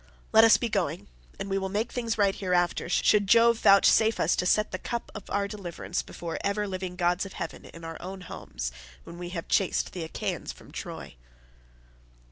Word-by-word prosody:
Let 220 - +8
us 225 - +7
be 240 - -1
going, 180 -7 -2 0.3
and - - -4
we 195 0 0
will 190 0 -3
make 215 +4 -1
things 230 -3 -2
right 200 -2 +3
hereafter, 175 -3 0
should 205 +3 +3
Jove 235 +1 +5
vouchsafe 220 +3 +5
us 165 - +3
to 180 - +1
set 210 +3 +2
the - - -4
cup 235 -1 -4
of 215 - -9
our 200 0 0
deliverance 195 -5 -4
before 170 -1 -6
ever 205 +1 0
living 185 -1 -4
gods 175 0 +1
of 195 - -8
heaven 160 - -6
in 165 - -12
our 165 0 -7
own 190 +1 -7
homes, - - -6 0.3
when 170 - -10
we 175 0 -5
have 175 -2 -5
chased 195 - +1
the 175 - -4
Achaeans 160 - -4
from - - -15
Troy." - - -7
195 Hz, 195 wpm, -28 LUFS, 175-210 Hz, 0.3 s, Let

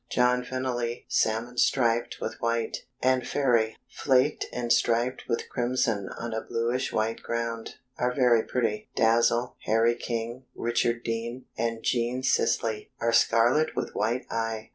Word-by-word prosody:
John 125 0 +3
Fennely, 125 -2 -3
salmon 120 +3 0
striped 120 -2 +2
with - - -5
white, 115 -1 -1 0.2
and 130 0 +3
Fairy, 120 -6 +1
flaked 135 +2 +1
and 120 -1 +1
striped 120 +2 +1
with 115 - -1
crimson 120 -5 0
on 115 -1 -4
a 110 - -2
bluish 120 +3 -1
white 110 +1 -1
ground, 115 -1 -3 0.2
are 125 0 +1
very 125 -3 +4
pretty. 110 -3 -2
Dazzle, 115 +2 +2
Harry 115 +2 +3
King, 120 +1 -4
Richard 120 0 0
Dean, 115 +2 -4
and 115 0 -2
Jean 120 +1 0
Sisley 110 -4 +1
are 115 0 +1
scarlet 120 +7 +3
with - - -3
white 115 +4 -1
eye. 115 -1 -3
120 Hz, 140 wpm, -27 LUFS, 115-125 Hz, 0.2 s, very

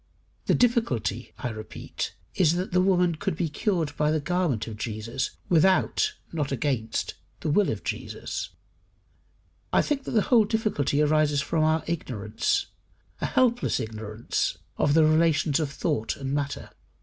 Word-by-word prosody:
The - - +4
difficulty, 130 - +1
I 125 - -3
repeat, 110 -4 -6 0.2
is, 165 -4 +3
that 180 +2 -2
the 180 +1 +3
woman 180 -2 +3
could 155 - -2
be 165 0 -1
cured 165 -3 -1
by 150 0 +2
the 155 0 +2
garment 165 - 0
of 110 - -6
Jesus, 110 +3 -4
without 190 - +3 0.2
(not 150 -4 -1
against) 125 -5 -1 0.3
the 155 - -1
will 205 +6 +3
of - - -3
Jesus. - - -4 1.2
I - - +4
think 280 -3 -1
that - - -4
the 210 - +4
whole 225 -3 +7
difficulty 205 - +1
arises 150 -1 +3
from 160 +1 +1
our 155 0 +2
ignorance 120 -11 -1 0.6
a - - +1
helpless 245 -2 +2
ignorance 110 0 -2 0.2
of 145 - +2
the 160 - +6
relations 155 -1 +3
of 155 -3 -1
thought 140 -5 -1
and 135 0 -4
matter. 145 0 -3
155 Hz, 150 wpm, -26 LUFS, 130-180 Hz, 1.2 s, whole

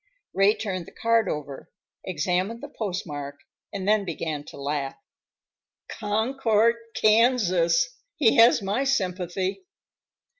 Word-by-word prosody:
Ray 195 +2 +4
turned 185 -5 -4
the - - -12
card 230 0 +1
over, 145 -2 -6 0.3
examined 185 - -2
the 290 - -7
postmark, 150 -9 -4 0.3
and 195 -1 -5
then 210 -1 +3
began 160 -4 -4
to - - -11
laugh. 140 -1 -3 0.9
"Concord, 225 +1 +1 0.2
Kansas. 220 - +3 0.3
He 275 -3 +3
has 230 -2 +6
my 205 +7 0
sympathy!" 190 - -1
200 Hz, 110 wpm, -25 LUFS, 175-230 Hz, 0.9 s, has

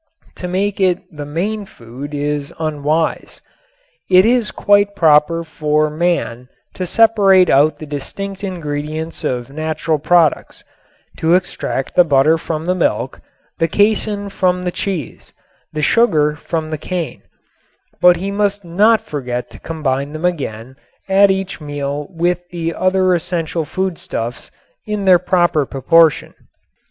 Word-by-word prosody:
To 180 - -5
make 195 +3 -1
it 185 -2 +1
the 145 -1 -6
main 200 +7 -3
food 130 +4 -9
is 145 0 -2
unwise. 155 0 -1 0.7
It 185 +1 +6
is 235 -2 +2
quite 205 +1 +2
proper 160 0 +3
for 155 -1 0
man 150 -7 -1 0.2
to 185 - -4
separate 200 -4 +4
out 145 +3 +4
the 155 - -8
distinct 195 +8 -6
ingredients 155 -3 -4
of 125 +1 -3
natural 155 +1 -2
products 165 0 +1 0.5
to 165 +2 +3
extract 180 -7 -2
the 180 - +6
butter 155 +1 +3
from 160 0 -4
the 180 - +1
milk, 185 - -1 0.4
the 165 - +2
casein 205 +2 +1
from 180 -2 0
the 180 - -1
cheese, 175 - -5 0.4
the 155 -1 -3
sugar 155 -9 +3
from 160 0 -4
the 155 - -3
cane 175 -2 -4 0.8
but 180 0 +7
he 190 +3 -4
must 205 -1 -1
not 210 +6 +3
forget 125 -4 -5
to - - -12
combine 145 -3 -3
them 155 +3 -4
again 130 -7 -3 0.3
at 195 +1 +5
each 190 -2 -2
meal 145 0 -4
with 175 +1 -2
the 170 -2 -3
other 185 0 +2
essential 165 -2 -2
foodstuffs 155 -9 -4 0.4
in 210 -2 -2
their 185 -2 +6
proper 175 -4 +2
proportion. 155 +4 +2
165 Hz, 135 wpm, -17 LUFS, 150-185 Hz, 0.8 s, but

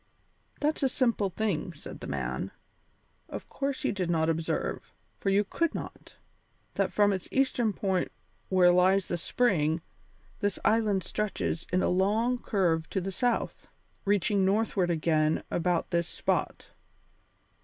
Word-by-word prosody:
"That's 300 +2 +1
a 270 - +3
simple 235 -6 +1
thing," 185 -3 -2
said 145 - -10
the - - -7
man. - - -3 0.8
"Of - - -7
course 275 -1 -3
you - - +2
did 185 -4 -2
not 160 -1 +2
observe, 165 0 -2 0.3
for 195 - 0
you 200 +1 +4
could 335 - -1
not, - - -8 0.6
that - - 0
from 205 -1 +3
its 185 - -4
eastern 255 -4 +2
point 190 -2 -1 0.4
where 180 -2 +6
lies 185 +2 +4
the 175 - 0
spring, 165 -6 +1 0.6
this 205 -2 0
island 210 -3 +3
stretches 200 -5 -2
in 185 +1 +2
a - - +2
long 215 +7 +2
curve 165 -8 0
to 195 - -1
the 190 +1 -3
south, 240 +5 -1 0.3
reaching 200 0 +2
northward 195 -2 +2
again 155 -2 +2
about 175 0 0
this 170 -1 +1
spot. - - -2
195 Hz, 145 wpm, -29 LUFS, 175-215 Hz, 0.8 s, where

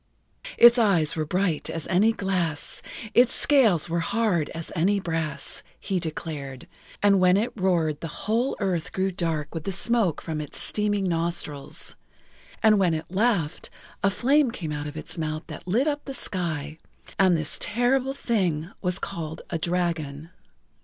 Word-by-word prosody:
"Its 240 +1 +8
eyes 175 -9 +3
were 155 -2 -2
bright 180 -2 0
as 165 -2 -4
any 200 +5 +3
glass, 185 -8 -2 0.3
Its 245 0 +5
scales 225 - +4
were 170 0 -1
hard 180 -4 0
as 165 0 -7
any 195 +5 +2
brass," 165 -5 -3 0.2
he 190 -2 -1
declared, 150 -5 -6 0.4
and 200 -1 +5
when 185 +1 +5
it 230 +4 0
roared 170 -7 +1
the 165 - -3 0.2
whole 230 +6 +1
earth 180 -3 -1
grew 190 0 0
dark 165 -5 -2
with 165 -2 -4
the 195 - -2
smoke 200 -2 +1
from 155 -2 -4
its 150 - -7
steaming 205 -1 +1
nostrils, 165 -5 -2 0.7
and 215 -2 +6
when 175 -4 +3
it 155 +2 -6
laughed 190 -6 0 0.3
a 200 - +4
flame 270 +6 +3
came 175 -10 -5
out 150 0 -4
of 150 +1 -7
its 165 +2 -5
mouth 155 0 -3
that - - -10
lit 230 +9 +2
up 295 -1 -1
the 275 - -4
sky, 160 - -2 0.4
and 185 -3 +5
this 155 -2 -2
Terrible 255 +4 +1
Thing 180 - -1
was 180 -1 -1
called 160 -1 -5
a 165 - -1
dragon. 165 -3 -2
175 Hz, 160 wpm, -25 LUFS, 160-205 Hz, 0.7 s, Its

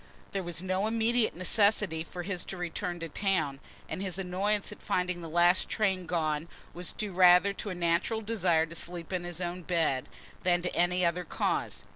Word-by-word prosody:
There 195 - -2
was 175 -1 -4
no 190 +2 0
immediate 230 +1 +2
necessity 195 -2 +3
for 175 +1 -7
his 180 -1 -3
return 175 -1 -4
to 165 - -4
town 160 -7 0 0.3
and - - -5
his 190 -2 -2
annoyance 195 +2 -1
at - - -11
finding 180 -1 -1
the 165 - -7
last 175 +3 +4
train 190 -4 0
gone 160 -2 -1 0.3
was 180 +1 -1
due 210 -3 -4
rather 180 +2 +6
to 205 - -5
a 185 - -4
natural 175 +6 0
desire 185 -7 +2
to 165 - -11
sleep 170 +1 -4
in 180 -1 -2
his 175 -1 -5
own 175 0 -3
bed, 160 -7 0 0.3
than 175 -1 +2
to 180 - -2
any 180 +1 +2
other 170 +1 0
cause. 165 - -2
180 Hz, 185 wpm, -30 LUFS, 170-195 Hz, 0.3 s, rather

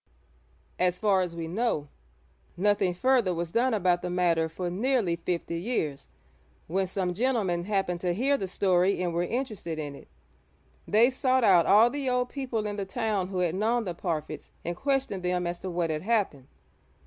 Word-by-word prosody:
As 180 0 +2
far 200 -2 +3
as 175 -2 -3
we 165 -1 -4
know, 180 -5 -1 0.7
nothing 200 -1 +2
further 230 -1 +2
was 170 0 -3
done 250 +5 +2
about 180 -5 +2
the 180 - -3
matter 170 -2 +1
for 175 +3 -4
nearly 215 -3 +1
fifty 170 0 -3
years, 170 - -2 0.6
when 190 +3 -1
some 180 -1 -2
gentlemen 200 -6 0
happened 195 -4 -1
to 180 - 0
hear 270 +7 +2
the 195 -9 -3
story 185 0 +2
and 175 -1 -1
were 170 - 0
interested 210 -5 -3
in 145 -2 -4
it. 140 - -13 0.8
They 230 +5 +5
sought 260 -1 +1
out 185 -6 +5
all 220 +4 +6
the 280 -2 -2
old 250 0 0
people 250 -6 -3
in 205 0 -3
the 200 - -2
town 205 -2 -1
who 185 -1 -2
had 175 -2 +1
known 225 +5 +1
the 180 -4 -4
Parfitts 165 -3 -4 0.2
and 175 +1 -2
questioned 270 -4 -1
them 180 0 0
as 175 0 -3
to 190 - -5
what 170 -2 -1
had 155 0 -2
happened. 190 - 0
185 Hz, 185 wpm, -28 LUFS, 175-230 Hz, 0.8 s, all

